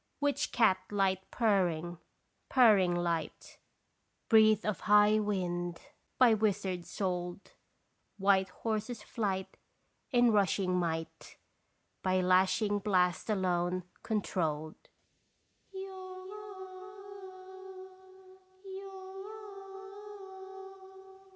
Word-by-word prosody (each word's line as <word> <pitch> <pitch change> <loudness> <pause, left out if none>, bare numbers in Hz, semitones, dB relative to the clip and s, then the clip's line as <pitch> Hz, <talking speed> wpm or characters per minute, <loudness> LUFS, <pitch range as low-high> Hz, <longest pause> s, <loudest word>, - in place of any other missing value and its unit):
Witch 285 0 0
cat 215 -6 +3
light 190 -2 0
purring, 175 -7 0 0.5
purrring 205 -9 +5
light, 170 -3 -3 0.7
Breathe 220 -1 +5
of 210 -2 -1
high 210 +1 +5
wind 175 -4 -2 0.4
by 245 -3 +6
wizard 200 -4 -1
sold, 180 -1 -4 0.7
White 195 -1 +3
horses' 220 +3 -4
flight 195 -4 -3 0.5
in 245 -2 +4
rushing 195 -3 +2
might 165 -2 -3 0.6
By 185 0 +1
lashing 185 +3 +2
blast 185 -2 +1
alone 180 -2 0 0.2
controlled. 160 -7 -3
190 Hz, 65 wpm, -31 LUFS, 180-210 Hz, 0.7 s, by